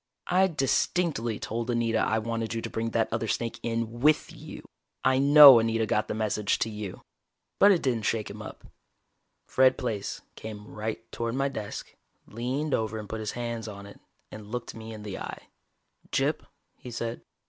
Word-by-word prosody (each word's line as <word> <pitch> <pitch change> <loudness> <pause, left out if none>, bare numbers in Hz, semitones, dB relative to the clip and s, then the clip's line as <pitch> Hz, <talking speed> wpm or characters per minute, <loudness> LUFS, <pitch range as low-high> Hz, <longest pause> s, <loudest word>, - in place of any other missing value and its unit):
"I 185 +2 +3
distinctly 140 - 0
told 115 +2 -4
Anita 115 -2 +1
I 110 - +1
wanted 115 0 -2
you 115 - -2
to - - -5
bring 115 +1 -2
that 115 0 +1
other 115 0 -1
snake 115 +1 -2
in 115 0 -3
with 150 +4 +3
you. - - -10 0.4
I 130 0 +4
know 140 -2 +10
Anita 115 0 +1
got 105 0 0
the - - -3
message 105 -1 0
to 110 - -6
you." 105 -3 -7 0.6
But 205 - +8
it 180 - +2
didn't 120 -5 0
shake 110 -2 0
him - - -8
up. - - -9 0.8
Fred 130 0 +4
Plaice 110 -5 -3
came 105 -1 -8
right 110 +1 -4
toward 115 0 -3
my 135 +1 +1
desk, 105 -6 -7 0.3
leaned 130 +7 -3
over 110 0 0
and 105 -1 -7
put 110 - -5
his 110 -1 -4
hands 115 -2 -4
on 100 -2 -8
it, 100 - -13 0.3
and 110 -1 -9
looked 120 -1 -4
me 110 0 -9
in 110 -1 -8
the 100 -2 -6
eye. - - -8 0.6
"Gyp," - - 0 0.3
he - - -10
said. 115 0 -4
115 Hz, 180 wpm, -28 LUFS, 110-125 Hz, 0.8 s, know